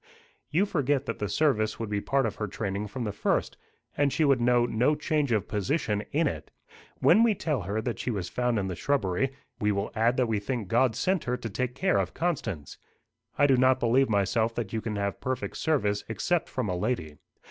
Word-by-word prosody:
"You 180 +7 +2
forget 145 -6 0
that 115 - -4
the 105 - -2
service 115 -9 +1
would 115 -2 -4
be 100 -1 0
part 135 +4 +1
of - - -3
her 105 - -2
training 100 +1 -3
from 120 +5 -5
the 105 - -2
first; 100 - 0 0.4
and 140 -1 +2
she 155 - +2
would 135 -4 +3
know 120 0 +4
no 120 +6 +2
change 150 -2 0
of 110 -3 +1
position 105 - -1
in 160 +3 +2
it. - - -3 0.5
When 205 +6 +6
we 230 -3 +4
tell 150 - -1
her 100 +4 -2
that 120 - -3
she - - -2
was 100 -6 -2
found 125 +1 0
in 100 - 0
the 95 -2 -3
shrubbery, 135 - 0 0.3
we 105 0 +2
will 100 0 -2
add 115 +3 +2
that 130 - +3
we 110 -2 0
think 105 -1 -4
God 120 +1 +3
sent 185 +6 0
her 125 0 -1
to 115 - -5
take 125 +3 -2
care 185 +6 +2
of - - -2
Constance. 110 - -3 0.6
I 145 - +5
do 135 -2 +4
not 130 +1 +4
believe 125 +2 +3
myself 110 +3 +1
that 115 -4 -4
you 110 - -1
can 110 -1 -3
have 100 -1 -2
perfect 130 0 -3
service 105 -10 0
except 170 +9 0
from 130 -4 -2
a 90 - -1
lady. 90 -7 -2
120 Hz, 220 wpm, -28 LUFS, 105-140 Hz, 0.6 s, When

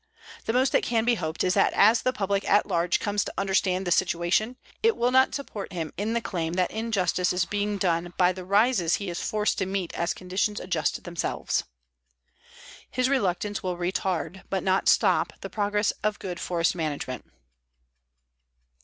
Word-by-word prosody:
The - - 0
most 260 +2 +3
that - - +3
can 230 -1 0
be 245 - +4
hoped 160 -7 -2
is 185 - +2
that - - +3
as 220 +4 +5
the 255 - +1
public 200 -3 -1
at 205 - +4
large 170 +1 +1
comes 205 -1 0
to - - -6
understand 190 -1 +1
the 175 - -2
situation, 180 +7 +1 0.3
it 455 0 +3
will 245 +1 +2
not 260 +1 +4
support 210 -9 -6
him 165 -3 -4
in 215 +3 -2
the 235 - 0
claim 165 -6 -3
that 180 0 0
injustice 205 -5 0
is 180 -1 +1
being 205 +1 -1
done 175 -2 0
by 180 0 +4
the 185 0 -7
rises 200 -2 +3
he 200 -3 -4
is 170 - -4
forced 210 0 0
to 190 - -1
meet 190 -2 -3
as 170 +1 -1
conditions 185 +3 -1
adjust 170 -4 -1
themselves. 175 -1 -2 1.2
His 255 +1 0
reluctance 205 -5 0
will 180 -3 -3
retard, 180 0 -2
but 190 -1 -1
not 190 0 +2
stop, - - +3
the - - -7
progress 205 0 +1
of 215 0 0
good 180 -3 -6
forest 170 -1 0
management. 150 -6 -4
190 Hz, 180 wpm, -26 LUFS, 175-210 Hz, 1.2 s, as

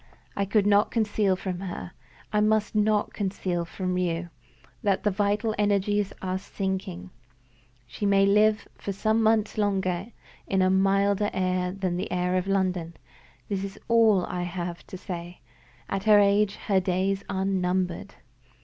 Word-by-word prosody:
I 200 - 0
could 200 +1 +2
not 205 0 +4
conceal 210 -3 +1
from 185 -1 -4
her 185 -2 -6 0.4
I 210 - +3
must 215 0 +2
not 210 0 +1
conceal 185 -3 -2
from 180 +1 -3
you 170 -1 -2 0.5
that 200 -2 +1
the 210 - +2
vital 205 +3 0
energies 205 0 +1
are 185 0 -1
sinking. 190 - -4 0.7
She 165 - -3
may 195 0 +4
live 210 +2 +3
for 200 - -5
some 220 +3 +1
months 220 -1 +2
longer 190 -2 0 0.4
in 190 -1 +2
a 185 - +3
milder 195 +1 +2
air 185 -1 0
than 185 -2 -2
the - - -4
air 180 0 0
of 185 +1 0
London. 185 -4 -1 0.5
That 195 -2 -2
is 195 -1 -6
all 220 -5 +4
I 180 - -3
can 175 -1 -4 0.2
say. 175 -2 -7 0.5
At 195 +1 -3
her 215 -1 +7
age, 205 0 +3
her 195 -3 +1
days 190 +2 0
are 190 -1 -1
numbered." 180 -2 -1
195 Hz, 150 wpm, -26 LUFS, 185-205 Hz, 0.7 s, her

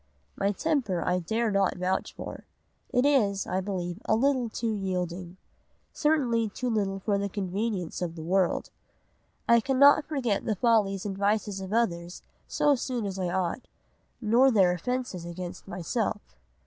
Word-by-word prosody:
My 200 0 +1
temper 220 - 0
I 180 0 +1
dare 220 +6 -1
not 195 -2 +1
vouch 185 +1 -1
for. - - -7 0.5
It 250 +2 +2
is, 210 -9 +2
I 185 +1 -1
believe, 180 -2 -4
too 220 - +1
little 260 -4 +2 0.2
yielding; 185 -3 -3 0.6
certainly 250 -8 +1
too 245 +4 -3
little 200 -3 0
for 200 +1 0
the 200 0 -2
convenience 195 -2 -3
of 170 -2 -3
the 160 - -7
world. 185 +2 +1 0.8
I 235 0 +6
cannot 280 +4 +5
forget 255 -9 -1
the 215 - 0
follies 205 -3 +2
and 200 -2 -3
vices 200 0 0
of 190 0 -6
others 175 -6 -1 0.2
so 295 - +3
soon 245 -3 -2
as 195 -1 -4
I 180 -2 -1
ought, 185 +6 -2 0.5
nor 240 +4 +4
their 195 -7 +4
offences 220 0 -3
against 175 +2 -7
myself. 180 -4 -2
200 Hz, 150 wpm, -28 LUFS, 185-235 Hz, 0.8 s, I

